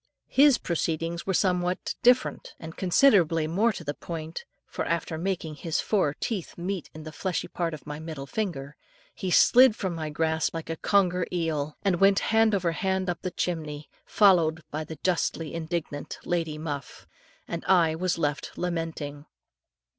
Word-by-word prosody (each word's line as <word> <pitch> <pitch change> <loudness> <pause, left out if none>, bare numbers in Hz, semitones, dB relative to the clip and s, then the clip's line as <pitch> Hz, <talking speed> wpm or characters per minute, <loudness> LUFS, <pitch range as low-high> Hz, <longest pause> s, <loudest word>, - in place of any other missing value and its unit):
His 275 -1 +6
proceedings 165 0 -2
were 190 - +1
somewhat 180 -1 0
different, 250 +1 +2
and 160 0 -9
considerably 180 - +4
more 200 +9 +2
to 185 - -8
the 145 -1 -3
point, 160 +1 -6 0.2
for - - -4
after 170 -1 -1
making 165 -2 -3
his 165 0 -2
four 185 -9 +1
teeth 205 -8 -4
meet 180 0 -4
in 155 - -8
the 155 - -8
fleshy 180 +1 -3
part 170 -2 -2
of 150 - -14
my 150 0 -6
middle 155 -3 -6
finger, 150 -6 -4 0.4
he 190 - -4
slid 245 +5 +6
from 190 -5 -3
my 160 -2 -4
grasp 160 +1 0
like 165 0 -4
a - - -2
conger 180 -2 +2
eel, 155 -4 -2
and 180 -3 +2
went 195 0 +6 0.2
hand 220 -1 +4
over 180 -3 0
hand 190 +2 -1
up 175 - -7
the 185 - -2
chimney, 155 -4 -4
followed 170 -6 +4
by 155 +1 -3
the 160 0 -8
justly 165 -3 0
indignant 160 -3 -4
Lady 165 -3 -1
Muff, 145 -3 -6 0.4
and 170 - -4
I 170 -4 +4
was 175 +2 -1
left 145 -3 -2
lamenting. 165 -4 -4
170 Hz, 165 wpm, -27 LUFS, 155-185 Hz, 0.4 s, His